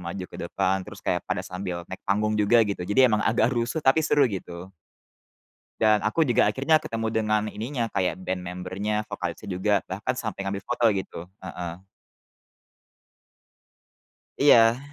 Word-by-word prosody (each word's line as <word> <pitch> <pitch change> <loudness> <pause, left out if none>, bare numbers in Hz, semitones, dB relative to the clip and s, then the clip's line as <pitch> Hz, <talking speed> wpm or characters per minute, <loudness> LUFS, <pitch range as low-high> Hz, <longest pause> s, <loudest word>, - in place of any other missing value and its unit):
maju 90 +2 -5
ke - - -11
depan, 95 +1 0
terus 95 - -11
kayak - - 0
pada - - -2
sambil 90 -2 -5
naik 95 +2 -9
panggung 105 +2 +1
juga 115 +3 +5
gitu, 100 -3 -3
jadi 130 +6 +5
emang 105 - +2
agak 115 +3 +2
rusuh 120 +6 -2
tapi 135 +4 +5
seru 145 -2 +3
gitu. 95 -5 -5 1.1
Dan 110 -2 +4
aku 130 +10 +1
juga 120 - +3
akhirnya 155 +4 +2
ketemu 115 0 -3
dengan 110 -1 +1
ininya, 115 +3 -3
kayak 95 -1 0
ben 95 0 -4
member-nya, 95 +4 -3
vokalisnya 100 -1 -5
juga, 100 +2 +1
bahkan 110 +7 -3
sampai 110 -4 -4
ngambil 100 0 -4
foto 120 -1 +2
gitu, 95 -3 -5
heeh. 85 -2 -7 2.6
Iya. 115 -4 +6
105 Hz, 150 wpm, -25 LUFS, 95-115 Hz, 2.6 s, Iya